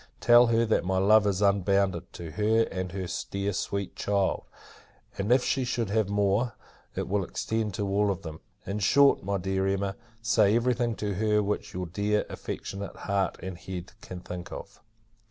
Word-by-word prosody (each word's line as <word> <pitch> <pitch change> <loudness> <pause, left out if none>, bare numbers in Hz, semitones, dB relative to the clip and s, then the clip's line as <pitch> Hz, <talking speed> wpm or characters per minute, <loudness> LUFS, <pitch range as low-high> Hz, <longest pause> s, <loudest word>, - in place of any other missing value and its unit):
Tell 120 0 +7
her, 115 0 +3
that 110 - +1
my 95 +1 0
love 105 +2 +5
is 100 0 +1
unbounded, 100 -2 +2
to 85 -2 -7
her 110 +4 +2
and 95 -1 -3
her 95 0 -4 0.2
dear 100 +1 -2
sweet 100 0 -3
child; 100 -2 0 0.7
and, 100 +4 0
if 125 0 +5
she 135 - +1
should 120 -4 -2
have 110 -2 +1
more, 100 +3 +1 0.4
it - - -2
will 100 0 0
extend 110 +2 -2
to 100 - -2
all 100 +1 +2
of 95 -3 -2
them. 80 -1 -7 0.3
In 100 +2 -3
short, 140 +8 +5
my 100 +1 -1
dear 95 +1 -1
Emma, 100 0 -1 0.2
say 115 -2 +3
every 120 +2 +2
thing 120 -1 -1
to 105 -1 -2
her, 105 +2 +2
which 105 -2 -3
your 90 0 -2
dear, 100 +4 0
affectionate, 100 0 -6
heart 100 -2 -1
and 95 -1 -5
head, 90 +1 -7
can 90 -2 -8
think 90 -1 -7
of. - - -9
100 Hz, 185 wpm, -28 LUFS, 95-110 Hz, 0.7 s, Tell